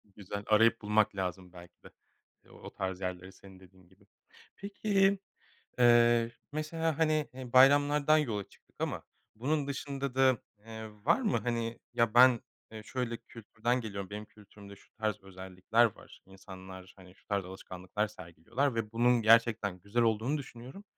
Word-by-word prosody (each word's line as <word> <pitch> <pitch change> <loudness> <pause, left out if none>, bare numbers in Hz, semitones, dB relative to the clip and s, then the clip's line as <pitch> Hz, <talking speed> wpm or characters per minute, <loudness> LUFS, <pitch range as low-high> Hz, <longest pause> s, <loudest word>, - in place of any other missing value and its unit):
Güzel, 100 0 -6
arayıp 115 +2 +4
bulmak 105 0 +2
lazım 90 -1 -4
belki 85 0 -15
de, - - -13 0.6
eee, - - -21
o - - -12
tarz 95 0 -4
yerleri, 90 0 -5
senin 95 0 -16
dediğin 95 -1 -20
gibi. 95 - -25 0.5
Peki, 200 -1 +1 0.6
eee, 120 -1 +5 0.2
mesela, 155 +1 -2
hani, 155 -2 +1
eee, 125 -2 -9
bayramlardan 145 +3 +5
yola 115 -10 -1
çıktık - - -25
ama - - -3 0.3
bunun 140 +5 -1
dışında 140 -1 -4
da, 130 -2 +4 0.2
eee, 110 +1 -9 0.2
var 170 - +3
mı, 215 -5 +1
hani, 115 -1 -3
ya, 115 -2 +1
ben, 125 0 +7 0.3
eee, 110 -1 -9
şöyle 120 0 -3
kültürden 115 +1 -3
geliyorum, 100 -3 -6
benim 105 +1 -7
kültürümde 100 -1 -15
şu - - -23
tarz 110 -1 -2
özellikler 95 +4 0
var, - - -16
insanlar, 95 -1 -12
hani, 90 -1 -16
şu - - -28
tarz 100 -3 -1
alışkanlıklar 95 +2 -5
sergiliyorlar 105 - -3
ve 110 -2 -3
bunun 120 +1 +3
gerçekten 110 -4 +3
güzel 100 +6 0
olduğunu 115 +6 +1
düşünüyorum. 135 +6 -10
115 Hz, 150 wpm, -31 LUFS, 95-130 Hz, 0.6 s, ben